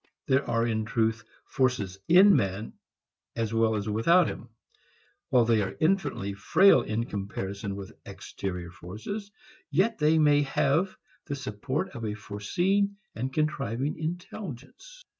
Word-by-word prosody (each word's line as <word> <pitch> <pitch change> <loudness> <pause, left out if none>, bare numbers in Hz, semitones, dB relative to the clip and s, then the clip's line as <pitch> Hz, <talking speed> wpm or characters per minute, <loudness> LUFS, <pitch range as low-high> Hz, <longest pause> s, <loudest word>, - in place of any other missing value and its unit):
There 135 +1 +1
are 115 0 +2
in 110 -2 0
truth 110 -1 0 0.2
forces 105 -8 -1
in 195 +4 +7
man 100 -3 -1 0.6
as 115 -1 -2
well 115 -1 +2
as 105 0 -3
without 140 +13 +4
him. - - -7 0.8
While 125 -2 +4
they 115 -2 +3
are 95 - -3
infinitely 160 - 0
frail 135 - +5
in 115 0 -2
comparison 100 -1 -5
with 100 -1 -8
exterior 90 -3 -6
forces, 110 - -7 0.4
yet 190 +9 +1
they 155 +1 +4
may 145 -2 +5
have 165 +6 +1 0.3
the 140 - -3
support 130 -2 -3
of 120 - -8
a 105 -1 -2
foreseeing 175 - -1 0.2
and 130 +4 -3
contriving 140 -2 -1
intelligence. 180 - -7
120 Hz, 135 wpm, -28 LUFS, 105-160 Hz, 0.8 s, in